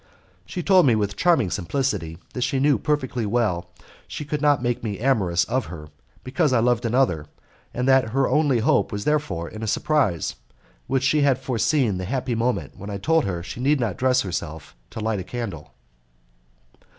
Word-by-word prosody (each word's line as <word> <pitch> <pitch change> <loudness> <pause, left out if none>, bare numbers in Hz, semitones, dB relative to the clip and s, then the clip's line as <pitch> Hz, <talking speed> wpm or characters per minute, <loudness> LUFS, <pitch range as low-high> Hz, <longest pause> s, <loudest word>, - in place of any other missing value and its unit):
She 180 - -4
told 185 -4 +5
with 100 -2 -1
charming 160 - +2
simplicity 90 - -2 0.2
that 125 - -4
she 130 +2 0
knew 145 +1 +3
perfectly 130 -5 -1
well 100 -6 0
that - - -24 0.2
she 150 - -6
could 150 0 -3
not 145 -4 +3
make 120 -1 -1
me 105 -3 -3
amorous 100 -9 +2
of 125 +7 -1
her, 80 -3 -9 0.3
because 140 +2 +1
I 120 - +4
loved 120 0 +1
another, 115 - +1 0.4
and 125 +1 -2
that 130 -3 +4
her 135 +3 +1
only 145 -6 +2
hope - - +2
was 100 -1 -4
therefore 145 - 0
in 110 - -9
a 110 - -3
surprise, 115 - 0 0.5
and 135 - 0
that 130 - +1
she 145 +3 +3
had 140 -3 +3
foreseen 125 -5 0
the 95 - -4
happy 125 +3 -2
moment 115 - -1
when 100 - -7
I 100 - -3
told 160 +10 +2
her 95 - -2
that 85 - -7
she 115 - -7
need 140 +3 +2
not 110 -7 -1
dress 130 0 +2
herself 80 -7 -5
to - - -8
light 110 -2 -1
a - - -4
candle. 100 -8 -6
120 Hz, 195 wpm, -23 LUFS, 100-135 Hz, 0.5 s, told